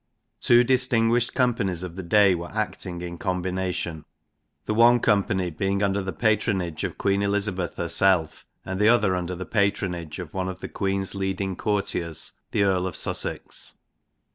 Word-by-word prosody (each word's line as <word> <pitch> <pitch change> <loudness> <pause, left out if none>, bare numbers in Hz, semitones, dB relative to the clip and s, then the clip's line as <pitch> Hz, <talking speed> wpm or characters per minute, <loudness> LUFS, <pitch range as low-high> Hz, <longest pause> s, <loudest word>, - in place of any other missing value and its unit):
Two 120 0 +5
distinguished 120 -2 +2
companies 100 -9 +1
of 90 -2 -7
the 95 - -5
day 100 +2 +4
were 85 0 -4
acting 95 -4 -3
in 85 -1 -6
combination 90 -3 -2 0.6
the - - -1
one 120 +2 +6
company 100 -5 +1
being 95 +5 -1
under 100 0 +1
the 95 0 -3
patronage 100 -7 0
of - - -3
Queen 100 0 +1
Elizabeth 100 -3 -1
herself, 90 -5 +1 0.2
and 95 0 -4
the 105 - +6
other 105 -6 +3
under 90 0 -3
the 95 +1 -6
patronage 95 -7 -1
of 85 -4 -7
one 95 -1 -2
of 95 0 -7
the - - -6
Queen's 95 -1 -1
leading 95 -1 -2
courtiers, 90 -6 -2 0.2
the 100 - +1
Earl 95 -2 +1
of 95 - -5
Sussex. - - -3
95 Hz, 160 wpm, -25 LUFS, 90-105 Hz, 0.6 s, one